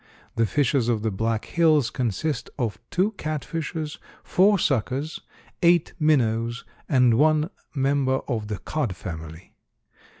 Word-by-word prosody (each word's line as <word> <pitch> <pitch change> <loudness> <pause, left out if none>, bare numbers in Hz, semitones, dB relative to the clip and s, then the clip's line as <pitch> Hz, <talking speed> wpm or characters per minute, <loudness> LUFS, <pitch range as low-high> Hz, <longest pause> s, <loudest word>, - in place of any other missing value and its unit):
The 115 -1 +2
fishes 135 -2 +1
of 110 -3 0
the 110 - 0
Black 110 +3 -1
Hills 155 -7 +3
consist 125 +4 -2
of 120 -6 -2
two 190 +4 +1
catfishes, 155 +1 -4 0.2
four 200 +3 +4
suckers, 135 - -1 0.4
eight 170 -1 +4
minnows, 120 -6 +1 0.2
and 125 -5 +4
one 155 +2 +3 0.2
member 135 -1 +1
of 110 -5 -2
the 105 -1 -3
cod 120 - -3
family. 80 0 -8
135 Hz, 125 wpm, -25 LUFS, 115-155 Hz, 0.4 s, four